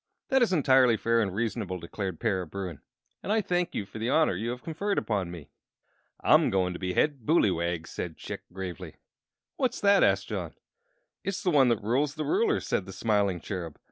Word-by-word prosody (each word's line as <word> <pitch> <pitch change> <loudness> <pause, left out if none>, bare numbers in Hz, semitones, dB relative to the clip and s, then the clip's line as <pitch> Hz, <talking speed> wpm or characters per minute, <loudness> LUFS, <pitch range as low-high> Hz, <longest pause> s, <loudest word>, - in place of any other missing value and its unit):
"That 265 -2 +3
is 235 - +3
entirely 130 -7 +4
fair 115 +1 +2
and 100 -3 0
reasonable," 105 -2 -2
declared 90 +1 -5
Para 95 -6 0
Bruin, 90 -4 -6 0.4
"and - - -3
I 220 - +3
thank 180 -3 -1
you 100 - -2
for 110 - -9
the 115 +2 -1
honor 155 - +3
you 110 +6 -3
have 125 +1 -5
conferred 195 +5 -2
upon 100 -5 -1
me." 85 -4 -10 0.7
"I'm - - +5
going 90 -2 +1
to 85 - -7
be 90 -1 -2
Head 145 -2 +2
Booleywag," 85 - +1
said 85 -1 -6
Chick, - - -6
gravely. 90 -2 -7 0.6
"What's 255 -2 0
that?" 200 -1 +5
asked - - +2
John. - - -4 0.7
"It's 195 +1 -3
the 180 - +2
one 135 -5 +5
that 115 -4 0
rules 135 +7 +1
the 155 - -3
ruler," 420 +3 +2
said 95 - -2
the 95 - -8
smiling 100 -3 +1
Cherub. 85 -6 -5
110 Hz, 195 wpm, -28 LUFS, -, 0.7 s, I'm